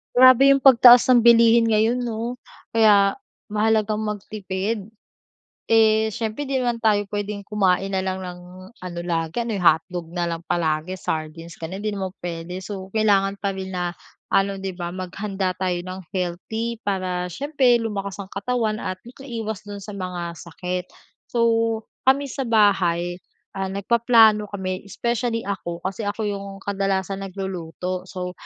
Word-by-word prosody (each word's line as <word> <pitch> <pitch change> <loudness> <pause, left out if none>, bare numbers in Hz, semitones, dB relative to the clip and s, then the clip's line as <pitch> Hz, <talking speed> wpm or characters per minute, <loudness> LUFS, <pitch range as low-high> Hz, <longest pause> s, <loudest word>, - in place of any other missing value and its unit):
Grabe 255 +2 +8
'yung 275 - +4
pagtaas 250 -2 +8
ng 245 -2 +5
bilihin 235 0 +6
ngayon 220 +3 +2
'no, 235 +1 -3 0.4
kaya 205 -3 +5 0.3
mahalagang 215 0 +1
magtipid. 205 0 -4 0.8
Eh, 220 -1 +4
siyempre 220 +5 -4
'di 265 -2 0
naman 240 -1 -1
tayo 215 -2 +3
puwedeng 205 0 -3
kumain 195 -2 +1
na 190 - 0
lang 190 0 -3
ng 180 -1 -7 0.4
ano 175 -1 -6
lagi, 165 +5 -1
ano 225 -4 -3
hotdog 175 0 +2
na 175 - 0
lang 170 -1 -2
palagi, 160 +1 -1
sardines 165 -1 -5
gano'n 185 +5 -6
hindi 215 - -1
naman 190 -2 -4
puwede, 175 +2 -5
so 190 -1 -6
kailangan 200 -2 +3
pa 200 0 -2
rin 190 -1 -6
na 175 -1 -1 0.4
ano, 195 0 +2
'di 195 0 -4
ba 175 -1 -5
maghanda 190 +1 -3
tayo 185 0 -2
ng 185 +1 -7 0.2
healthy 220 +6 -3
para 185 -4 -2
siyempre 265 - +2
lumakas 200 -3 -3
ang 190 - -17
katawan 220 0 -1
at 185 - -3
magkaiwas 230 -5 -6
do'n 205 -1 -7
sa 210 - -8
mga 180 -3 -4
sakit. 180 +1 -5 0.4
So 235 -1 0 0.6
kami 270 +2 +5
sa 270 -1 -3
bahay, 180 -5 +2 0.3
ah, 195 0 -3
nagpaplano 215 +1 +4
kami 190 -1 -5
especially 235 +2 -2
ako, 175 -4 -5
kasi 195 +3 -3
ako 205 +2 -2
'yung 200 -1 -5
kadalasan 195 -1 -1
nagluluto. 185 -1 -5
So 180 -1 -5
200 Hz, 150 wpm, -23 LUFS, 185-220 Hz, 0.8 s, Grabe